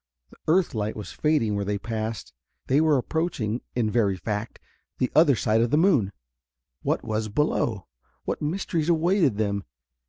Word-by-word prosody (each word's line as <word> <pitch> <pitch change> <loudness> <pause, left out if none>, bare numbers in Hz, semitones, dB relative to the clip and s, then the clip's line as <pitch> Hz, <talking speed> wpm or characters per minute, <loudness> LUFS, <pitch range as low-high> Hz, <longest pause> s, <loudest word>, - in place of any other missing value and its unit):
The - - -17
earth 185 +1 +3
light 110 -1 -2
was 105 - -7
fading 145 -9 +1
where 100 - -1
they 100 +1 -1
passed. 110 - -4 0.3
They 140 +3 +3
were 155 -3 +4
approaching, 125 -6 -1
in 115 -3 +1
very 105 -5 +2
fact, 105 +3 -4 0.4
the 125 - 0
other 150 -4 +6
side 110 0 +2
of 120 - +2
the 150 - +3
moon. 150 - +3 0.7
What - - -1
was 110 0 -2
below? 110 - 0 0.4
What - - -3
mysteries 165 0 -1
awaited 170 - +3
them? 100 -2 -1
115 Hz, 160 wpm, -25 LUFS, 105-155 Hz, 0.7 s, other